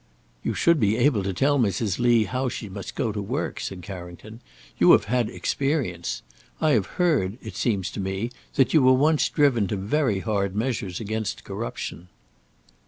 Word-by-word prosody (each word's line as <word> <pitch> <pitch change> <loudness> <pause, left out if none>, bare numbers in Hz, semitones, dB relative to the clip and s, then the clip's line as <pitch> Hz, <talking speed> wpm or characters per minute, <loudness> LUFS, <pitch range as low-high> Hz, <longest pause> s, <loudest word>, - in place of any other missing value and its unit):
"You - - -2
should 170 -2 +3
be 105 -1 +2
able 125 -4 +3
to 95 0 -2
tell 140 +9 +2
Mrs. 105 -2 0
Lee 120 -2 +4
how 130 +3 -2
she 115 - -6
must 95 -1 -7
go 110 - 0
to 105 0 -4
work," 125 +10 -3
said 95 -2 -5
Carrington; 95 +4 -9 0.4
"you - - +7
have - - +4
had 120 0 0
experience. 90 - -2 0.4
I 155 -1 +3
have 110 -8 +2
heard, 140 - +2
it - - -8
seems 100 -7 -1
to - - -6
me, 95 +5 -2 0.2
that 135 -3 +3
you 155 - +6
were 130 0 +6
once 150 +4 +3
driven 130 -9 +2
to 105 - -2
very 105 0 0
hard 100 -3 -1
measures 105 -6 -2
against 110 -1 -3
corruption." 85 +3 -6
110 Hz, 175 wpm, -25 LUFS, 95-130 Hz, 0.4 s, you